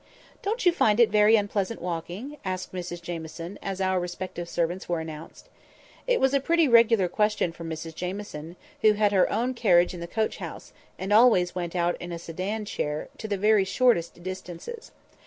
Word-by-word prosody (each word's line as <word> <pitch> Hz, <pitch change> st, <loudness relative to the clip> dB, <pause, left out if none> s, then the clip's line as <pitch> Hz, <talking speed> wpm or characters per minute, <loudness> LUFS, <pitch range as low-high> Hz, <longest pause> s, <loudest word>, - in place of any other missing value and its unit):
"Don't 430 Hz, +3 st, -2 dB
you 355 Hz, -, +7 dB
find 215 Hz, -9 st, +2 dB
it 235 Hz, -4 st, +5 dB
very 210 Hz, +1 st, +6 dB
unpleasant 205 Hz, +1 st, -1 dB
walking?" 180 Hz, -, -5 dB
asked 185 Hz, -2 st, -4 dB
Mrs 175 Hz, -1 st, -6 dB
Jamieson, 170 Hz, +2 st, -6 dB
as 195 Hz, -1 st, -4 dB
our 190 Hz, -1 st, +1 dB
respective 175 Hz, -1 st, -5 dB
servants 175 Hz, +2 st, -2 dB
were 170 Hz, -1 st, 0 dB
announced. 160 Hz, 0 st, -9 dB, 0.6 s
It -, -, +3 dB
was 265 Hz, +1 st, +2 dB
a 275 Hz, -, +4 dB
pretty 330 Hz, +3 st, +3 dB
regular 230 Hz, -5 st, +5 dB
question 210 Hz, -1 st, +1 dB
from 165 Hz, 0 st, -8 dB
Mrs 160 Hz, 0 st, -6 dB
Jamieson, 180 Hz, -2 st, -6 dB, 0.3 s
who 215 Hz, -1 st, +6 dB
had 210 Hz, -1 st, +2 dB
her 190 Hz, -3 st, +3 dB
own 240 Hz, +4 st, 0 dB
carriage 180 Hz, -8 st, +3 dB
in 175 Hz, -, -7 dB
the 170 Hz, -, -6 dB
coach 220 Hz, +5 st, -1 dB
house, -, -, -8 dB, 0.2 s
and 195 Hz, +2 st, -2 dB
always 215 Hz, -6 st, +5 dB
went 175 Hz, -1 st, -4 dB
out 175 Hz, 0 st, 0 dB
in 175 Hz, -, -6 dB
a 170 Hz, -, -4 dB
sedan 185 Hz, +6 st, -4 dB
chair 150 Hz, -6 st, -3 dB
to 220 Hz, -, -5 dB
the 205 Hz, -2 st, -1 dB
very 210 Hz, 0 st, +4 dB
shortest 190 Hz, -5 st, +1 dB
distances. 185 Hz, -, -7 dB
185 Hz, 185 wpm, -26 LUFS, 175-220 Hz, 0.6 s, you